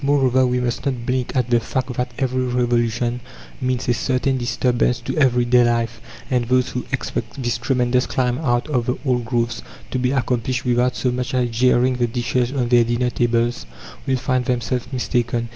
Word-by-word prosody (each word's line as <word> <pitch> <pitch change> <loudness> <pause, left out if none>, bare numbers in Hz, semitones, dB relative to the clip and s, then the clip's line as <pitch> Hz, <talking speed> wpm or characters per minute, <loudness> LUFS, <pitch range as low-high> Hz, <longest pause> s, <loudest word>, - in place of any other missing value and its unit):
Moreover, 130 -2 +3
we 125 0 0
must 125 -1 -2
not 125 -4 -2
blink 125 0 -1
at 125 -2 0
the 120 - +5
fact 130 +2 -3
that 125 +1 -2
every 130 -1 0
revolution 120 -1 0 0.4
means 130 0 -1
a 120 - +3
certain 130 +2 0
disturbance 125 -1 +1
to - - -4
everyday 125 -4 +4
life, 115 -1 0 0.3
and 125 -2 +2
those 125 +1 +2
who 125 - -5
expect 130 0 -3
this 120 -1 -1
tremendous 125 -1 +1
climb 125 -1 0
out 120 -6 0
of 125 -6 -1
the 125 - 0
old 125 -3 +1
grooves 120 -1 -1 0.3
to 130 - -1
be 125 0 +1
accomplished 125 -1 -1
without 125 0 +2
so 125 - 0
much 125 +1 -3
as 125 -2 +1
jarring 125 +2 +3
the 120 -1 +1
dishes 120 +1 -1
on 130 -4 -1
their 120 -1 +5
dinner 120 +1 0
tables 120 - 0 0.4
will 130 -1 +2
find 130 -1 0
themselves 125 +1 -2
mistaken. 120 -2 -1
125 Hz, 185 wpm, -21 LUFS, 120-130 Hz, 0.4 s, the